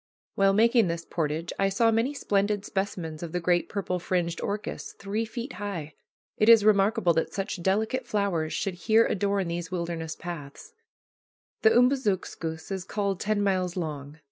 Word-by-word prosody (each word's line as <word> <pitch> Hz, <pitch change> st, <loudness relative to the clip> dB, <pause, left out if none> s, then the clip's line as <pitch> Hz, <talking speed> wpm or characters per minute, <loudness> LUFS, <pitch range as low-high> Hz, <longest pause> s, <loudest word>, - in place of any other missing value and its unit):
While 195 Hz, 0 st, +3 dB
making 230 Hz, 0 st, +4 dB
this 170 Hz, 0 st, -3 dB
portage 160 Hz, 0 st, -2 dB
I 195 Hz, 0 st, +3 dB
saw 225 Hz, +4 st, +3 dB
many 230 Hz, +6 st, +1 dB
splendid 205 Hz, -4 st, 0 dB
specimens 180 Hz, -7 st, -3 dB
of 170 Hz, -1 st, -6 dB
the 180 Hz, -, 0 dB
great 175 Hz, 0 st, +1 dB
purple 180 Hz, -3 st, -2 dB
fringed 175 Hz, -1 st, -1 dB
orchis, 210 Hz, +1 st, -4 dB
three 205 Hz, +3 st, -3 dB
feet 240 Hz, +3 st, -6 dB
high. 170 Hz, -7 st, -4 dB, 0.4 s
It 215 Hz, -, +4 dB
is 225 Hz, -3 st, +8 dB
remarkable 200 Hz, -4 st, +4 dB
that 165 Hz, -, 0 dB
such 195 Hz, -2 st, -4 dB
delicate 220 Hz, +7 st, 0 dB
flowers 195 Hz, -8 st, 0 dB
should 195 Hz, -, -2 dB, 0.2 s
here 225 Hz, +1 st, +6 dB
adorn 200 Hz, -1 st, 0 dB
these 170 Hz, 0 st, -4 dB
wilderness 170 Hz, -3 st, -3 dB
paths. 170 Hz, -, -8 dB, 0.9 s
The 445 Hz, -, +6 dB
Umbazookskus 205 Hz, -, +1 dB
is 190 Hz, -2 st, -3 dB
called 200 Hz, -1 st, -2 dB
ten 210 Hz, -1 st, 0 dB
miles 185 Hz, -2 st, 0 dB
long. 150 Hz, -3 st, -5 dB
195 Hz, 160 wpm, -27 LUFS, 170-210 Hz, 0.9 s, is